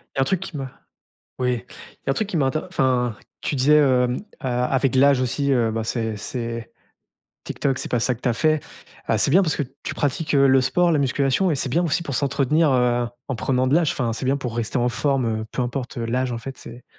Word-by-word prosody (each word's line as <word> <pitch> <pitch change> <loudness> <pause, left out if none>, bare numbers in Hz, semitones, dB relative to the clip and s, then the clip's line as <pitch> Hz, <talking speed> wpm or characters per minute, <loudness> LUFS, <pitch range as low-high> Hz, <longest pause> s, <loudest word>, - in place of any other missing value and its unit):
il - - -9
y - - +1
a - - +4
un - - +5
truc 180 +7 0
qui 190 -2 -8
m'a 135 -2 -5 0.7
oui, 125 -2 0
il - - -15
y - - +1
a - - +5
un - - +2
truc 210 +9 -1
qui 175 - -1
m'a 140 - +2
inter 155 +4 -1
enfin 125 - 0 0.3
tu - - -2
disais, 145 +3 +5
heu, 130 -3 +4 0.3
a 125 -3 -1
avec 135 0 +1
l'âge 140 0 +5
aussi, 140 +3 0
heu, 120 -4 +2
ben, 110 0 -2
c'est 110 -1 -2
c'est 115 +1 -5 0.7
TikTok, 135 -2 -1
c'est - - -5
pas 125 - +2
ça 125 +2 0
que 115 - -20
tu 125 - +1
as - - +1
fait. 155 +5 +2 0.5
Heu, - - +3
c'est - - +2
bien 190 +4 +6
parce 160 - 0
que - - 0 0.2
tu - - -3
pratiques, 150 +3 -1
heu, 140 0 +5
le 135 0 +5
sport, 175 +7 +2
la 150 - +2
musculation 140 +6 +1
et - - +1
c'est 135 - -2
bien 170 +7 +1
aussi 170 0 0
pour 140 -6 -3
s'entretenir, 145 +2 +2
heu, 120 -1 +2 0.2
en 135 - -2
prenant 130 +2 0
de 135 - +3
l'âge, 165 -3 +3
enfin, 120 -3 -1
c'est 115 - -6
bien 135 +2 +2
pour 125 -5 -5
rester 120 +2 -2
en 120 - +2
forme, 120 -4 0
heu, - - -6
peu - - -2
importe 125 +1 -4
l'âge, 125 +2 -1
en 120 - -3
fait, 135 +3 -8
c'est 120 - -11
130 Hz, 260 wpm, -22 LUFS, 120-145 Hz, 0.7 s, bien